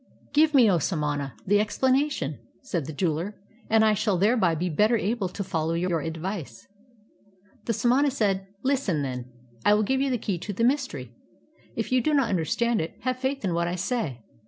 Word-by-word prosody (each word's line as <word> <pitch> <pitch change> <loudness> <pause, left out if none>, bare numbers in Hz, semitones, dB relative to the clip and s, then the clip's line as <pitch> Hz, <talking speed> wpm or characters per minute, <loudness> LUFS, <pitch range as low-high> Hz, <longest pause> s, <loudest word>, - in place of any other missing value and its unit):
'" - - -31
"Give 305 0 +4
me, 250 -4 +7
O 180 -4 +3
samana, 145 - -2
the 205 +2 +4
explanation," 260 - 0 0.2
said 175 - -3
the - - -4
jeweler, 170 +5 -1 0.3
"and 220 0 +5
I 215 - +4
shall 210 -2 +1
thereby 195 -3 +3
be 175 +3 -1
better 210 +8 +3
able 210 -2 -1
to 200 - -4
follow 165 -2 -1
your 170 -1 0
ad\'ice." 165 +2 -5 1.0
The 230 - 0
samana 255 +6 +3
said: 195 -7 0 0.2
"Listen, 260 - +1
then; 125 -2 -5 0.3
I 205 - +5
will 215 - +2
give 265 +5 +1
you 275 - +1
the 250 - +1
key 200 -5 -3
to 205 - -5
the 230 - -1
myster}'. 240 - 0 0.6
If 225 - -3
you 255 0 +4
do 300 +5 +1
not 260 -7 +2
imderstand 220 +7 +1
it, 160 - -4
have 255 -1 -1
faith 265 -2 -2
in 180 - 0
what 170 0 0
I 175 - -2
say. 180 - -2
205 Hz, 195 wpm, -26 LUFS, 165-245 Hz, 1.0 s, me